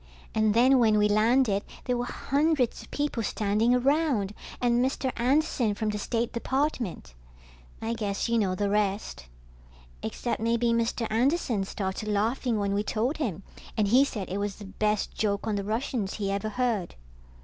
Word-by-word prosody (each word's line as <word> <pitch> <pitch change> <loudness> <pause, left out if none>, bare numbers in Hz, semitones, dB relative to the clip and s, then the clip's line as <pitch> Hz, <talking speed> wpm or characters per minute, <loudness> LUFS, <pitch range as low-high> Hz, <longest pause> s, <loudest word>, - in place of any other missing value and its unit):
And 215 -1 +2
then 255 +3 +5
when 220 -3 +4
we 210 0 +4
landed 215 0 +3 0.2
there 250 - +1
were 245 0 -1
hundreds 285 -1 0
of - - -14
people 290 -5 -1
standing 215 +3 +1
around, 260 -6 +1 0.3
and 240 0 +2
Mr. 265 0 -1
Anderson 245 -4 +1
from 215 +1 -1
the 210 0 -2
State 230 +2 -1
Department. 240 - -2 0.7
I 225 +1 -1
guess 205 -3 -2
you 235 0 +2
know 190 -3 +1
the 205 +2 0
rest. 200 - -1 0.7
Except 235 - -3
maybe 235 +1 +2
Mr. 230 0 0
Anderson 240 - +1
started 190 +2 -4
laughing 225 +3 0
when 200 -1 0
we 200 - +1
told 230 +7 -1
him, 200 - -3 0.3
and 210 -2 +2
he 255 +5 +6
said 215 -9 -3
it 195 - -2
was 200 -1 -2
the 210 - -10
best 210 +1 -1
joke 205 -2 -1
on 220 -2 0
the 200 - -2
Russians 220 -1 -2
he 200 -2 -2
ever 200 +2 -2
heard. 225 -5 -1
220 Hz, 170 wpm, -27 LUFS, 205-250 Hz, 0.7 s, he